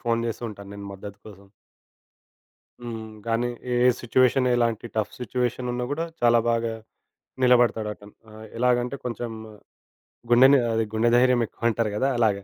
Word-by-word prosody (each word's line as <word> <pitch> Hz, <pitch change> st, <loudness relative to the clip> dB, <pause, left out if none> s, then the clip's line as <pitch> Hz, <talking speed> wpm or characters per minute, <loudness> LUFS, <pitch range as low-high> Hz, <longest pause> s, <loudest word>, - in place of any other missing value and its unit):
Phone 115 Hz, -2 st, 0 dB
జేస్తూ 115 Hz, +1 st, -4 dB
ఉంటాను 100 Hz, -1 st, -11 dB
నెను 100 Hz, 0 st, -8 dB
మద్దతు 100 Hz, +1 st, -10 dB
కోసం. 100 Hz, -1 st, -13 dB, 1.4 s
హ్మ్, 110 Hz, -2 st, -7 dB, 0.2 s
గానీ 115 Hz, +2 st, 0 dB, 0.2 s
ఏ -, -, +1 dB, 0.3 s
సిట్యుయేషన్ 125 Hz, +1 st, +2 dB
ఎలాంటి 120 Hz, -1 st, 0 dB
టఫ్ 105 Hz, -1 st, -1 dB
సిట్యుయేషన్ 125 Hz, 0 st, -2 dB
ఉన్నా 125 Hz, 0 st, -2 dB
కూడా 165 Hz, +3 st, -2 dB, 0.2 s
చాలా 120 Hz, -1 st, +5 dB
బాగా 115 Hz, -1 st, 0 dB, 0.7 s
నిలబడతాడటను. 110 Hz, -4 st, +2 dB, 0.2 s
ఆ! -, -, -15 dB, 0.3 s
ఎలాగంటే 125 Hz, +2 st, +1 dB
కొంచెం 120 Hz, -1 st, -4 dB, 1.0 s
గుండె‌నే 130 Hz, +3 st, +7 dB
ఆదే 115 Hz, 0 st, +1 dB
గుండె 115 Hz, +2 st, +2 dB
ధైర్యం 125 Hz, -1 st, +4 dB
ఎక్కువంటారు 115 Hz, -2 st, -1 dB
కదా! 135 Hz, +6 st, +1 dB
అలాగా. 105 Hz, -4 st, +1 dB
120 Hz, 135 wpm, -24 LUFS, 110-125 Hz, 1.4 s, గుండె‌నే